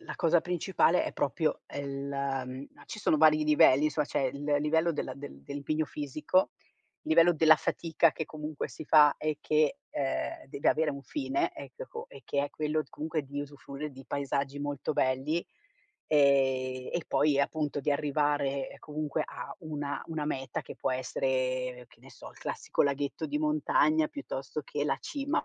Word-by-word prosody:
la 340 - -8
cosa 170 -1 +4
principale 180 0 +2
è - - -3
proprio 155 +3 0
è 145 - -6
la, 140 -1 -2
mhmm, 130 +2 -7
no - - -18
ci 215 - -7
sono 180 - +2
vari 155 0 +5
livelli, 150 -1 +6
insomma, 150 0 0
c'è 140 - -1
il 140 +2 -2 0.2
livello 160 +3 +2
della 150 - -3
del 70 - -10
dell'impegno 145 - -2
fisico, 150 +5 0 0.5
i - - -9
livello 165 +2 +6
della 160 -1 +7
fatica, 165 +2 +2
che 160 - -4
comunque 155 -1 -5
si - - -9
fa 150 -1 +6
e 155 -1 -2
che, 155 -1 +2
ehm, 135 -2 -2
deve 140 - 0
avere 155 -1 +3
un 140 -1 -7
fine, 300 - -1
eccheco 475 -1 -8
e - - -13
che 140 0 0
è 145 - -3
quello 155 0 -1
t - - -23
comunque 155 0 -3
di 140 +1 -5
usufruire 145 +1 -7
di 135 0 -12
paesaggi 140 0 -2
molto 145 -1 -2
belli, 135 +6 0 0.6
ehm, 130 -3 +3
e 170 - -1
poi 145 -1 +3
e - - +4
appunto 145 0 -1
di 145 - 0
arrivare, 145 -1 0
comunque, 150 -1 -2
a - - -7
una 145 -3 -4
una 160 -2 -3
meta 135 -4 -3
che - - -9
può - - -1
essere, 130 -1 -1
che - - -22
ne - - -15
so, - - -11
il - - -18
classico - - -1
laghetto 140 +2 -1
di 150 0 -1
montagna, 155 0 +3
piuttosto 135 +2 -5
che 145 +1 -3
la 150 - +1
cima, 285 -1 -2
145 Hz, 180 wpm, -30 LUFS, 140-155 Hz, 0.6 s, della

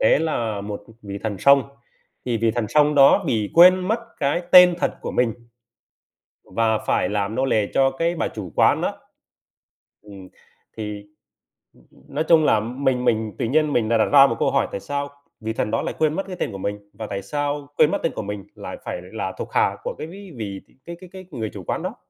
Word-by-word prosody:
tế - - +4
là 115 -10 -2
một, 100 0 -6
ừm, 115 - -18
vị 100 -1 -6
thần 105 -4 -3
sông, 140 +5 +5 0.6
thì 120 -2 -1
vị 115 +1 +1
thần 115 -2 -2
sông 150 +2 +3
đó 145 +7 +6
bị 110 -7 -1
quên 180 +2 +7
mất 225 +2 +1 0.2
cái 145 +5 0
tên 180 -1 +9
thật - - +1
của - - -5
mình, 120 -3 +1 1.2
và 110 -1 +2
phải 90 - 0
làm 105 +1 -2
nô 130 +1 +1
lệ 110 -5 +1
cho 135 0 +3
cái 165 +5 -1
bà 160 - -1
chủ 95 -6 -8
quán - - +3
á. - - 0 1.1
Ừm, 100 -3 -13 0.5
thì, 105 -1 -5 0.7
ưm, - - -24
ưm, - - -18
nói 155 - +1
chung 160 -2 +5
là 110 - +4
mình 125 +2 -1
mình 110 -2 0
tự - - 0
nhiên 150 +4 +1
mình 110 -2 +1
đã 115 - +3
đặt 110 - +3
ra 140 -1 +9
một 115 - -2
câu - - +1
hỏi: - - +1
"Tại - - -4
sao 140 +5 -4 0.3
vị 110 0 -4
thần 105 - -2
đó 115 - 0
lại - - -4
quên 155 -1 +2
mất 195 - -2
cái 185 - -6
tên - - -2
của 100 - -7
mình? 100 +1 -5
Và 110 - -7
tại 100 -1 -4
sao 145 +7 -3
quên 155 - +5
mất - - +1
tên 165 - +1
của - - -3
mình 100 -1 -6
lại - - -8
phải 90 - -5
là 95 +1 -5
thuộc - - -7
hạ - - +2
của - - -4
cái 155 - -6
ví 190 +2 -11
vị 100 -3 -5 0.3
cái 170 0 -7
cái 185 - -12
cái 185 0 -10
người 115 -6 -4
chủ 100 - -8
quán - - -3
đó?" - - -4
115 Hz, 230 wpm, -22 LUFS, 105-150 Hz, 1.2 s, tên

